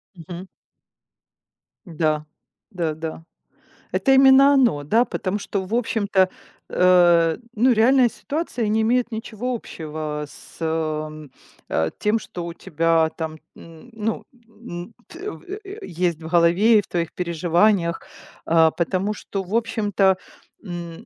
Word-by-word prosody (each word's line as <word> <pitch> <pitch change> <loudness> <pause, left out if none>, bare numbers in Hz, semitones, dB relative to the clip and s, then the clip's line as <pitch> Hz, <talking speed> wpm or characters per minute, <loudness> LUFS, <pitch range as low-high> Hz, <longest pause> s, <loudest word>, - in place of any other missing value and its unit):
Мгм. 175 +2 -9 1.4
Да. 155 -3 -1 0.5
Да, 170 -5 -2
да. 160 +1 -6 0.7
Это 270 - +1
именно 270 +1 +7
оно, 240 - +3
да? 225 +12 +3
Потому 200 -2 -3
что, 200 -1 -3
в 195 - -7
общем-то, 205 -5 +1 0.4
э, 175 -2 +4 0.2
ну 245 +4 +4
реальная 245 +2 +4
ситуация 280 -4 -3
не 220 +1 +2
имеет 245 +2 +1
ничего 225 +2 -4
общего 155 -7 -5
с, - - -15
эм, 155 -2 -3 0.4
э, 80 0 0
тем, 210 +2 +1
что 175 -5 -7
у 170 - -6
тебя 165 0 +1
там, 160 -1 -4 0.2
м, 165 +7 -14
ну, 225 -1 -3
м 230 -4 -10
т 370 +5 -7
в - - -12
э, 405 +1 -8
есть 170 - -2
в 160 - -7
голове 175 +7 +4
и - - +1
в - - -19
твоих 170 -2 -2
переживаниях. 170 +1 +1 0.4
А, 165 -1 +5
потому 185 +5 -1
что, 200 -1 -5
в 190 +4 -4
общем-то, 205 -4 +2 0.5
м 175 -4 -7
185 Hz, 135 wpm, -22 LUFS, 165-225 Hz, 1.4 s, именно